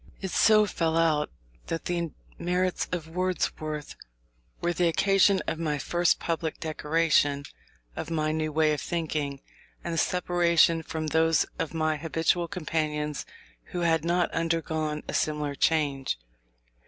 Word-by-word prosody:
It 190 -2 -4
so 215 -1 +5
fell 165 -4 0
out 155 -3 +2 0.4
that 165 - -3
the 170 -2 -1 0.3
merits 180 +1 0
of 170 -3 -3
Wordsworth 160 -4 -2 0.6
were 175 - 0
the 175 0 +2
occasion 195 +3 +4
of 160 - -3
my 150 -3 0
first 175 +4 +1
public 165 -1 -2
declaration 155 -2 +1 0.5
of 160 - -5
my 155 -2 0
new 155 0 -1
way 155 0 +3
of 150 - -3
thinking, 150 -5 -2 0.4
and 165 -1 -1
separation 170 -2 +3
from 160 0 -4
those 160 0 +3
of 160 - -3
my 155 -1 +1
habitual 165 +2 0
companions 155 -4 -2 0.4
who 175 - -4
had 165 -2 +2
not 175 +1 +1
undergone 160 -2 -1
a - - -4
similar 150 -2 0
change. 140 - +1
160 Hz, 135 wpm, -27 LUFS, 155-170 Hz, 0.6 s, so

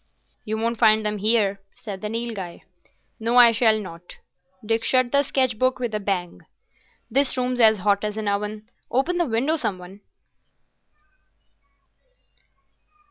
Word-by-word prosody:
"You 220 +1 -3
won't 230 +1 -2
find 220 -2 +4
them 210 0 -2
here," 205 -2 +2 0.2
said 200 -3 -8
the 210 - -4
Nilghai. 225 -6 -5 0.6
"No, 230 +2 -1
I 240 -1 +9
shall 220 -1 +3
not." 175 -3 -10 0.5
Dick 225 +1 0
shut 255 -1 +2
the 280 - +4
sketch 260 -4 -1
book 255 0 +1
with 240 -3 -4
a 215 - -1
bang. 190 -3 -3 0.7
"This 270 +2 +2
room's 250 0 -1
as 220 -2 +6
hot 200 +1 +1
as 210 0 -3
an 215 -1 -3
oven. 210 +1 -3 0.2
Open 330 +8 0
the 345 - +2
window, 260 +8 0
some 205 -10 -2
one." 185 +3 -13
220 Hz, 145 wpm, -23 LUFS, 205-245 Hz, 0.7 s, I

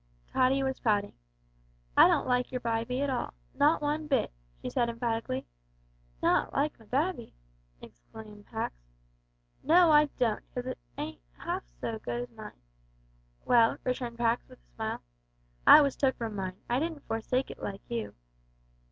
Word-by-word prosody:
Tottie 265 +1 +3
was 265 0 -2
pouting. 205 -3 +1 0.8
"I - - +9
don't - - +2
like 250 0 +1
your 250 - -2
bybie 235 +2 -1
at 285 - 0
all 250 - -3 0.2
not 295 +3 +3
one 300 +1 -1
bit," 270 -5 +1 0.3
she - - -6
said 240 -1 +1
emphatically. 230 - -2 0.8
"Not - - +3
like 295 0 0
my 225 - -17
babby!" 285 - -1 0.5
exclaimed 205 - -13
Pax. 220 - -3 0.9
"No, 335 +2 +6
I 300 0 +7
don't, 230 -4 +1
'cause 250 - -3
it - - -5 0.2
isn't - - -5 0.2
'alf - - -3
so 225 -1 -3
good 240 +2 -3
as 245 - -11
mine." 215 -1 -10 0.9
"Well," 230 -2 +5
returned 245 -2 -2
Pax, 235 0 +1
with - - -14
a - - -34
smile, - - -4 0.6
"I 305 - +11
was 280 -2 +1
took 265 -2 +2
from 225 -3 -4
mine. 185 -1 -4
I 240 +2 +1
didn't 320 -1 -3
forsake 250 +4 -1
it - - -11
like 195 0 -6
you." 110 -3 -4
240 Hz, 160 wpm, -30 LUFS, 220-270 Hz, 0.9 s, I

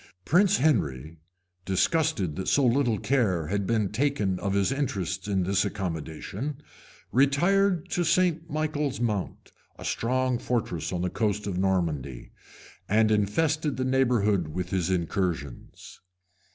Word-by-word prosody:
] 90 - -46
Prince 195 +4 +4
Henry, 80 - 0 0.4
disgusted 95 - +1
that 95 - -4
so 140 - +3
little 120 -2 +2
care 100 - +1
had 100 0 -1
been 110 -4 +1
taken 110 -6 0
of 100 -1 -1
his 100 +4 +2
interests 100 - -2
in 95 -2 +1
this 95 +2 +1
accommodation, 100 - -4 0.5
retired 175 +7 +2
to 175 - +1
St. 170 -1 +1
Michael's 150 -2 -2
Mount, 105 -5 -3 0.3
a - - -9
strong 130 +1 0
fortress 90 -11 -2
on 90 -1 -2
the 90 - -1
coast 105 -2 -1
of 95 -3 -2
Normandy, 80 -10 -1 0.6
and 110 +2 +3
infested 145 +8 +1
the 130 - -1
neighborhood 120 -9 +2
with 90 +3 -5
his 90 -3 0
incursions. 85 -6 -3
105 Hz, 135 wpm, -27 LUFS, 90-140 Hz, 0.6 s, Prince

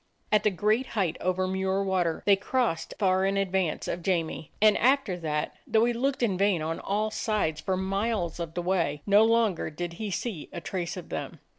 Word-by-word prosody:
At 210 -1 +5
the 210 - +3
great 215 +7 +1
height 175 -5 +1
over 185 +1 0
Muir 190 +1 0
Water 180 -4 0
they 200 - +6
crossed 215 -3 -1
far 190 -2 +2
in 195 +1 +1
advance 190 -4 0
of 175 - -3
Jamie, 165 -4 -2
and 215 -1 +6
after 260 -6 +3
that, 150 -3 -2
though 220 +1 +3
he 240 - +1
looked 260 +2 -1
in 195 -6 +1
vain 195 -5 +2
on 165 +1 -3
all 215 +2 -1
sides 200 -9 -1
for 190 -1 -1
miles 195 -2 -1
of 165 -1 -5
the 175 - -2
way, 165 -5 0
no 205 +1 +6
longer 225 -5 +2
did 170 +2 -5
he 215 - -2
see 195 -4 -4
a - - -5
trace 180 +1 -4
of 180 - -8
them. - - -5
190 Hz, 200 wpm, -27 LUFS, 175-215 Hz, -, they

